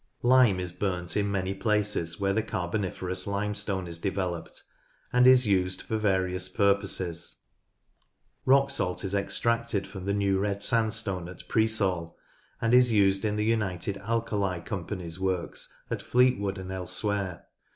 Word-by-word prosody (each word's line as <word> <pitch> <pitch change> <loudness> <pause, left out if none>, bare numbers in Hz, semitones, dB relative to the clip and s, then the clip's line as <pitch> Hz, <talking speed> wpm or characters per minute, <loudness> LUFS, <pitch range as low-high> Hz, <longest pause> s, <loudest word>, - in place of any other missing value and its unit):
Lime 120 -6 +5
is 90 -1 -4
burnt 90 -2 -2
in 100 -1 +1
many 95 -1 -1
places 105 -5 0
where 100 0 +1
the 110 - +2
Carboni 95 -1 -2
ferous 95 +1 -3
Limestone 100 -2 -2
is 85 -1 -7
developed, 95 -3 -3 0.5
and 125 0 +6
is 130 -1 +7
used 95 -2 +1
for 110 - -3
various 95 -3 +1
purposes. 100 -4 0 1.0
Rock 140 +1 +4
salt 90 -9 -1
is 95 0 -3
extracted 115 +1 0
from 95 -2 -8
the 100 0 0
New 100 -1 +1
Red 100 0 -1
Sandstone 110 -6 0
at 90 - -11
Preesall, 100 -7 +1 0.4
and 115 +1 +1
is 125 -1 +6
used 100 -2 +3
in 105 -1 0
the 105 0 0
United 100 -4 -1
Alkali 100 -4 -1
Company's 90 -3 -5
works 95 -2 -2 0.2
at - - -2
Fleetwood 110 -6 +2
and 95 0 -7
elsewhere. 95 0 -3
100 Hz, 145 wpm, -28 LUFS, 95-110 Hz, 1.0 s, is